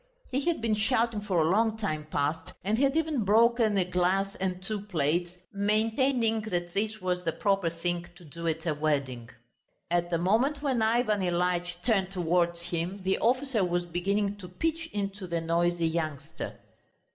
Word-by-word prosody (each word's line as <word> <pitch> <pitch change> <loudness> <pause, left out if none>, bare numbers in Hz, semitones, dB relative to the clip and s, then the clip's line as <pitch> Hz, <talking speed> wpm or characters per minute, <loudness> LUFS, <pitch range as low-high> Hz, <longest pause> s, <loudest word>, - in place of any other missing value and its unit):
He 265 +2 0
had 340 -7 +1
been 225 -1 +1
shouting 225 0 +1
for 195 -4 0
a 160 +1 +3
long 220 +2 +2
time 155 -8 -3
past, 150 +2 -1
and 210 +4 +1
had 275 +2 +3
even 315 -7 +1
broken 225 +1 +4
a 185 - +3
glass 185 +2 +1
and 185 -1 -2
two 205 +2 -3
plates, 175 -3 0 0.2
maintaining 225 +3 +1
that 175 -5 -3
this 215 +2 -1
was 180 -1 -1
the 165 - 0
proper 195 -1 +1
thing 175 +1 -3
to 175 -1 -15
do 170 +3 -6
at 160 +1 -2
a 160 - +1
wedding. 140 -6 -1 0.6
At 175 0 +1
the 170 - +1
moment 230 - +1
when 260 -5 +1
Ivan 220 -2 +2
Ilyitch 175 0 -1
turned 195 -6 +2
towards 175 -2 +1
him, 175 +3 -3
the 190 +1 +1
officer 255 -2 +2
was 175 0 0
beginning 200 +4 -1
to 185 -3 -10
pitch 325 - -2
into 200 -1 -3
the 170 -1 -1
noisy 170 +1 +1
youngster. 155 -4 -4
190 Hz, 170 wpm, -29 LUFS, 175-220 Hz, 0.6 s, broken